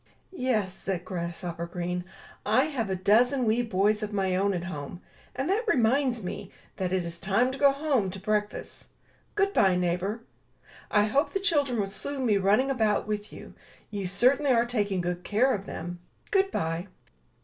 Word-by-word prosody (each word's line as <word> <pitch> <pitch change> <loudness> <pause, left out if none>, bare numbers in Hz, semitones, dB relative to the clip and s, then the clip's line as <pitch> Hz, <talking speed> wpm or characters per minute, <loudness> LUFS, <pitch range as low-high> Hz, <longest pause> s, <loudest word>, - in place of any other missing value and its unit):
'*Yes," 235 - 0
said 190 -2 -4
Grasshopper 170 -1 -4
Green, 180 +1 -3 0.4
"I 220 +6 +3
have 270 -9 -2
a 190 - 0
dozen 240 +7 +3
wee 225 +2 +2
boys 210 -1 +1
of 210 0 -3
my 190 -2 0
own 200 +2 +2
at 175 - -3
home; 165 -1 -6 0.4
and 270 - -2
that 405 +5 +1
reminds 250 - +2
me 190 +2 -6 0.3
that 185 -2 -2
it 185 -2 0
is 170 0 -6
time 210 +8 +2
to 265 - -6
go 280 -1 +6
home 275 -8 0
to 195 +1 -7
breakfast! 210 +1 -3 0.4
Good 400 -1 +2
bye, 190 -2 +4
neighbor. 180 +5 -1 0.7
I 210 - +4
hope 270 +8 +1
the 390 - +1
children 290 - +1
will 200 - +1
soon 260 +7 -4
be 210 -4 +3
running 210 +8 +3
about 220 -5 +1
with 210 -1 -4
you. - - -11 0.4
You 200 -3 -3
certainly 255 +9 +3
are 235 -1 +4
taking 205 -6 -1
good 175 0 -3
care 250 +6 +2
of 200 -1 -4
them. 175 +2 -6 0.3
Good 390 -1 +3
bye." 165 - -2
210 Hz, 180 wpm, -27 LUFS, 185-255 Hz, 0.7 s, go